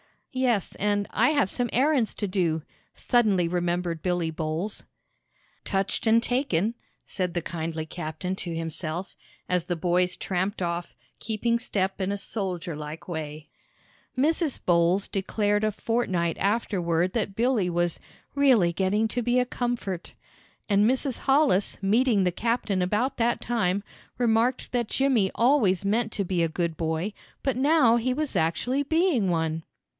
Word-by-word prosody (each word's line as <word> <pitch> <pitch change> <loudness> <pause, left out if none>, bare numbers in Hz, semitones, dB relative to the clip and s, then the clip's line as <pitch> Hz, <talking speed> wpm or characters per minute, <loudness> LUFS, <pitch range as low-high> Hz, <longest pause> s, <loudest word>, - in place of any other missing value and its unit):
"Yes, 250 -6 0
and 205 0 0
I 240 +6 +3
have 285 -10 +2
some 245 +2 -1
errands 265 -3 +2
to 205 - -2
do," 170 -5 0 0.3
suddenly 210 -8 +2
remembered 175 -1 -1
Billy 175 -3 0
Bowles. 160 +6 -3 0.8
"Touched 195 +3 -1
and 230 +1 +5
taken!" 235 - 0 0.3
said 180 -3 -3
the 175 - -1
kindly 160 -1 -4
captain 160 +3 -4
to 170 -3 -5
himself, 165 +2 -4 0.3
as 180 -2 +1
the 175 - -1
boys 180 +2 +1
tramped 190 +2 -2
off, 170 0 -3 0.2
keeping 230 +2 0
step 195 -4 -1
in 190 +1 0
a - - -2
soldier 185 -5 -4
like 150 +1 -7
way. 155 -2 -5 0.7
Mrs. 310 +2 +1
Bowles 175 +3 +3
declared 205 +2 0
a 215 - +1
fortnight 190 -7 -1
afterward 185 -5 +1
that 205 -4 -2
Billy 230 -5 +2
was 175 -1 0 0.3
"really 255 -11 +4
getting 195 +5 +1
to 245 - -2
be 245 +1 +1
a 250 - +3
comfort!" 240 -8 -3 0.6
And 205 +2 +4
Mrs. 265 0 -1
Hollis, 270 -8 +3
meeting 220 +1 +3
the 180 - +2
captain 220 -1 0
about 210 +9 0
that 235 +1 +1
time, 205 -5 0 0.3
remarked 240 +1 +1
that 240 -2 0
Jimmy 250 -6 +2
always 230 -7 +3
meant 220 +2 +1
to 200 - -1
be 180 -2 0
a 165 - +3
good 165 0 -2
boy, 165 +5 -2 0.3
but 270 -3 0
now 265 -4 +4
he 250 +2 0
was 300 +1 -3
actually 245 - +1
being 305 - +2
one. 160 -1 -1
200 Hz, 150 wpm, -26 LUFS, 175-240 Hz, 0.8 s, and